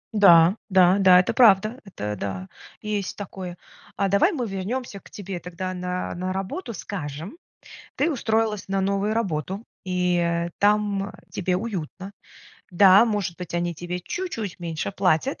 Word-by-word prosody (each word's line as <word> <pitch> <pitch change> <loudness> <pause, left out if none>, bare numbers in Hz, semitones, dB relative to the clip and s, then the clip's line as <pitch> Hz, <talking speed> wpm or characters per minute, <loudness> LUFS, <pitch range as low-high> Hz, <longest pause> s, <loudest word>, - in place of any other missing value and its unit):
Да, 175 -2 +7
да-да, 185 0 +6
это 185 - +1
правда. 215 0 +4
Это, 105 - -5
да, 95 -2 -5 0.4
есть 210 -2 -3
такое. 185 -3 -7 0.4
А 200 -1 +1
давай 200 - +4
мы 255 - -3
вернемся 200 +3 -4
к - - -18
тебе 195 -3 -6
тогда 180 +1 -5
на 180 0 -3
на 185 +1 -3
работу. 195 - -4
Скажем, 165 - -6 0.6
ты - - +2
устроилась 220 - -1
на 195 0 0
новую 200 +2 0
работу, 190 -2 -2 0.2
и, 180 -1 0
э, 170 0 0
там 205 -1 +1 0.2
тебе 180 -1 -1
уютно. 195 -2 -5 0.6
Да, 190 +3 +7
может 205 -7 -2
быть, 180 -1 -7
они 175 0 -1
тебе 175 +2 -5
чуть-чуть 225 - -5
меньше 165 +2 -4
платят, 190 - +1
190 Hz, 145 wpm, -24 LUFS, 175-210 Hz, 0.6 s, Да